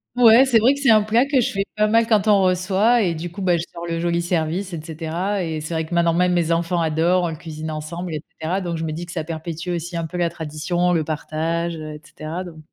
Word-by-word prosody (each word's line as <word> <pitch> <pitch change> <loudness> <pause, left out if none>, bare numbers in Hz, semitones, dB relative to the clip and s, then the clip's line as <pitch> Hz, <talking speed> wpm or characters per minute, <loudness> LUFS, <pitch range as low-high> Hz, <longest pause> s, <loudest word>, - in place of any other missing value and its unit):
Ouais, 240 0 +7
c'est 255 -4 +4
vrai 245 +5 +4
que 280 - -6
c'est 275 -1 +2
un 215 -2 +6
plat 225 +4 +3
que 275 -2 +2
je 240 - +1
fais 195 0 -1
pas 210 0 +3
mal 225 +1 +3
quand 215 -2 +2
on 205 -2 +5
reçoit 190 +5 +3
et 175 -3 +1
du 165 +2 -6
coup, 200 - -8
bah, 180 -2 +3
je 165 - -2
sors 170 - -7
le 165 -1 -2
joli 170 0 0
service, 175 +2 -1
et 165 - -4
cetera, 165 +5 -3
et 160 -2 -3
c'est 150 +3 -5
vrai 160 0 -1
que 160 - -8
maintenant, 170 -1 +2
même 180 +1 +2
mes 170 -2 +1
enfants 170 +1 +1
adorent, 165 +3 +2
on 175 - 0
le 160 - -5
cuisine 160 -1 -7
ensemble, 165 +3 -5
et 150 - -4 0.2
cetera, 170 +4 -1
donc 175 -3 -3
je 160 - -4
me 155 - -3
dis 165 +3 -5
que 170 - -10
ça 165 -3 -3
perpétue 165 +1 -6
aussi 175 0 -3
un 165 -1 -2
peu 180 - -6
la 175 -1 +1
tradition, 170 +3 -1
le 165 -2 +1
partage, 160 +2 -2
et 155 -1 -8
cetera, 155 +3 -6
donc 170 -3 -11
170 Hz, 275 wpm, -21 LUFS, 160-190 Hz, 0.2 s, Ouais